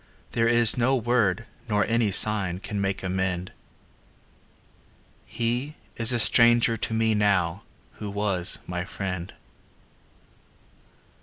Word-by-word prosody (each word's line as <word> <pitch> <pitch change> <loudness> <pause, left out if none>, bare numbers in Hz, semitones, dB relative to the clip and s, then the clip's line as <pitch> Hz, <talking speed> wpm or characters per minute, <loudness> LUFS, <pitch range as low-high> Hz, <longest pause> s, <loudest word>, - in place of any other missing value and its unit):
There 115 0 0
is 120 0 +5
no 130 +3 +1
word 115 -3 -1 0.2
nor 105 -1 0
any 115 -3 -1
sign 100 -3 +5
Can 100 0 -6
make 95 0 -4
amend 95 -1 -4 1.8
He 120 +6 -4 0.2
is 115 +1 +3
a 120 - 0
stranger 115 0 +3
to 115 - -4
me 110 0 0
now 100 -4 -1 0.4
Who 105 - -7
was 100 -3 -1
my 90 0 -5
friend. 90 -1 -7
105 Hz, 110 wpm, -24 LUFS, 95-115 Hz, 1.8 s, is